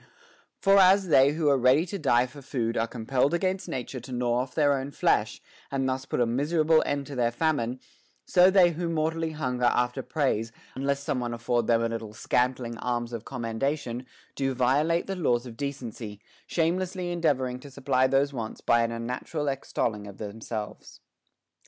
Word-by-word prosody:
For 195 0 +5
as 190 0 +5
they 140 -1 +5
who 155 -1 0
are 140 -2 +3
ready 130 +6 +4
to 195 +2 -5
die 125 -5 +3
for 135 +3 -12
food 120 -4 -2
are 115 - +1
compelled 125 +6 0
against 185 +2 -1
nature 130 0 -4
to 125 +2 -11
gnaw 120 -1 0
off 130 +1 -4
their 145 -3 +4
own 135 0 -2
flesh, - - +1 0.3
and 135 -1 -1
thus 130 0 -2
put - - -2
a 120 - +4
miserable 155 +6 +2
end 140 -1 -1
to 140 - -8
their 120 -2 +2
famine; 125 -2 -1 0.5
so 180 +1 +6
they 185 -2 +5
who 170 +1 -3
mortally 160 0 -1
hun 125 -5 -2
ger 125 - +2
after 125 +2 +1
praise, 130 -7 -1 0.2
unless 140 +1 -1
some 135 - -1
one 120 -1 -3
afford 120 0 0
them 115 -1 +3
a 115 - 0
little 115 -2 -5
scant 125 +3 +1
ling 115 -2 -6
alms 120 -1 -2
of 115 -1 -5
commendation, 125 +1 -3 0.3
do 135 -1 -1
violate 145 +7 +2
the 195 - -3
laws 125 -9 +1
of 120 -2 -9
decency, 120 -6 -6 0.3
shamelessly 180 +2 -1
endeavoring 135 -7 0
to 140 - -11
supply 130 -1 +1
those 140 +1 +2
wants 115 -4 -5
by 120 0 +3
an 115 0 0
un 115 0 -4
natural 145 +5 -3
extolling 115 -6 -2
of 100 -1 -10
themselves. 110 0 -7
130 Hz, 190 wpm, -27 LUFS, 120-155 Hz, 0.5 s, so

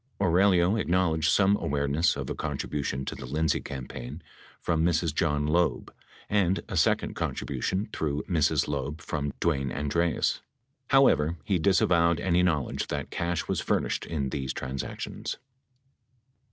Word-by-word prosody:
Aurelio 95 +1 +4
acknowledged 85 -5 +1
some 100 0 +4
awareness 70 +2 +1
of - - -4
a - - -2
contribution 70 -2 -3
to - - -4
the 65 - -8
Lindsay 80 +3 +1
campaign 65 +3 -7 0.4
from 80 -2 0
Mrs. 85 -2 +1
John 75 -2 +1
Loeb 85 +3 0 0.3
and 95 -3 +1
a - - -5
second - - +2
contribution 95 +3 -2
through 75 -2 -2
Mrs. 80 -6 +2
Loeb 70 +1 -3
from 75 -4 -3
Dwayne 70 -6 0
Andreas. 75 +4 0 0.5
How 135 0 +6
ever, 80 - +2
he 95 +2 0
disavowed 85 -2 +3
any 90 -1 +2
knowledge 80 -6 0
that - - -4
cash 85 -1 -2
was - - -1
furnished - - -1
in 70 -5 -2
these 65 -2 -3
transactions. 65 0 -5
80 Hz, 140 wpm, -27 LUFS, 70-90 Hz, 0.5 s, How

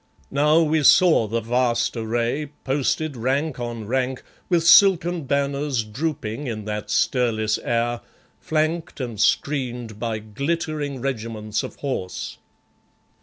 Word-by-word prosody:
Now 150 +4 +4
we 155 0 +2
saw 155 -5 +5
the 115 +2 -1
vast 120 +1 +1
array, 120 +6 -1 0.2
posted 145 +2 0
rank 135 +4 -1
on 120 -2 -5
rank 130 +2 -1 0.3
with 170 -3 +2
silken 175 -3 +5
banners 140 -2 0
drooping 125 +1 -4
in 110 -3 -4
that 105 0 -4
stirless 110 -4 +1
air, 120 0 -1 0.4
flanked 160 +1 -1
and 120 -5 -5
screened 125 -6 0
by 115 -2 -2
glittering 140 +5 -3
regiments 110 -4 -3
of - - -7
horse. 125 -10 -4
130 Hz, 120 wpm, -23 LUFS, 115-150 Hz, 0.4 s, saw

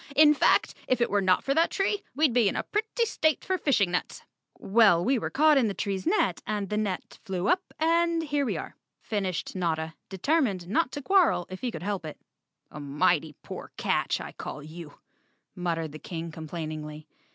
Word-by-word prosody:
In 300 +1 +7
fact, - - +3
if 255 - +2
it 240 - +1
were 205 0 +2
not 185 -1 +3
for 275 - +1
that 325 +3 +3
tree, 395 +1 0
we'd 295 -3 +3
be 230 -4 +4
in - - -4
a - - -1
pretty 440 +3 -1
state 315 - 0
for 375 - +1
fishing 205 - +2
nets." 180 - -3 0.3
"Well, 200 -5 +4
we 260 +1 +2
were - - -3
caught 300 0 +4
in 240 - +2
the 200 - -3
tree's 195 -2 -3
net, 180 -3 +1
the 210 -1 -2
net 205 -4 -3
flew 185 -2 -2
up 365 +1 +3 0.2
and 335 +1 +2
here 290 -2 0
we 265 - -1
are," - - -7 0.3
finished 195 -5 -3
Notta, 160 -3 -1 0.2
determined 200 - 0
not 250 - +1
to 285 - -5
quarrel 365 - +3
if 185 - -7
he 250 - -1
could 175 -8 -7
help 200 -2 -2
it. 155 -1 -8 0.5
"A 150 - -8
mighty 150 +2 +1
poor - - -8
catch, - - 0
I - - -7
call 150 - -7
you," 155 -1 -10 0.6
muttered 165 -3 -2
the 155 - -9
King 165 0 -6
complainingly. 155 -1 -6
200 Hz, 195 wpm, -27 LUFS, -, 0.6 s, In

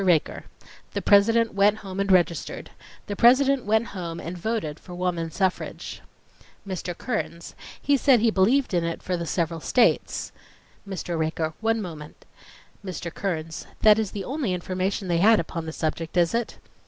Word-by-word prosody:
RAKER: 175 -5 +1 0.5
The - - -2
President 225 +3 +4
went 200 +2 +4
home 195 -2 -7
and 200 0 +1
registered. 175 -4 +1 0.3
The 205 - -4
President 260 +4 +4
went 220 +2 +1
home 170 -4 -5
and 170 +2 -6
voted 175 -5 -3
for 180 - -10
woman 175 -2 -2
suffrage. 185 +3 -3 0.7
MR. 180 -2 -4
KEARNS: 190 -8 -4 0.3
He 285 0 +2
said 265 -2 +5
he 225 +1 +3
believed 225 +6 +2
in 175 -1 +2
it 165 0 -4
for 180 - -1
the 170 -1 -4
several 165 -1 -1
states.... 235 +8 +1 0.6
MR. 175 -3 -3
RAKER: 160 0 -1
One 225 -1 +1
moment—— 155 -4 -9 0.6
MR. 175 -3 -6
KEARNS: 165 -4 -4 0.2
That 215 0 +7
is 215 -3 -1
the 200 0 -5
only 265 -9 -1
information 185 +2 -2
they 170 -1 +1
had 220 +4 +6
upon 165 0 -4
the - - -3
subject, 160 +2 -3
is 170 -1 +3
it? 235 -1 -2
185 Hz, 165 wpm, -25 LUFS, 170-220 Hz, 0.7 s, That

